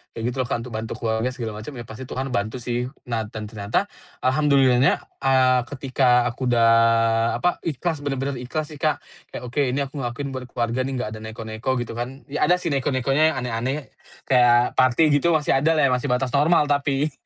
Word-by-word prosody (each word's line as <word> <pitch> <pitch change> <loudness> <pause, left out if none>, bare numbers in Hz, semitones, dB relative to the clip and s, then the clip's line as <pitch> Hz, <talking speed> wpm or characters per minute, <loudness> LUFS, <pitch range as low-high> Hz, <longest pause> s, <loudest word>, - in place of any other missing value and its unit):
kayak 115 - -5
gitulah, 130 0 -2
Kak, 115 - -2
untuk 125 - -9
bantu 110 0 -4
keluarga 110 0 -1
segala 110 -4 -5
macem 135 +6 -8
ya 120 - -6
pasti 115 +3 -9
Tuhan 130 +1 -4
bantu 110 +2 -2
sih. 120 0 -2 0.2
Nah 110 -2 -1
dan 110 0 -7
ternyata 105 - -2 0.3
alhamdulillahnya, 135 -2 +3 0.2
eee, 130 -1 +4
ketika 130 -2 +2
aku 130 +2 -4
udah 115 -2 +4 0.7
apa, 180 - +1
ikhlas 160 +1 -2
bener-bener 135 -2 -3
ikhlas 150 +5 -4
sih, 150 - -10
Kak, 155 +1 0 0.3
kayak, - - -6
"Oke 130 +3 0
ini 135 +3 0
aku 140 +1 -7
ngelakuin 135 +2 -4
buat 130 -1 -6
keluarga 120 0 -2
nih 135 - -4
gak 125 -4 -3
ada 110 - -7
neko-neko," 110 +2 -5
gitu 115 - -9
kan, 130 +3 -6
ya 145 - +1
ada 180 - +5
sih 180 -2 -3
neko-nekonya 140 +3 +1
yang - - -4
aneh-aneh, 125 +4 -3 0.3
kayak 120 -2 +3
party 130 +5 +4
gitu 170 +3 +2
masih 150 -3 +2
adalah 155 +1 +2
ya, 135 - +4
masih 125 +2 0
batas 125 0 0
normal 150 +1 +3
tapi. 140 +1 +1
130 Hz, 195 wpm, -23 LUFS, 120-140 Hz, 0.7 s, ada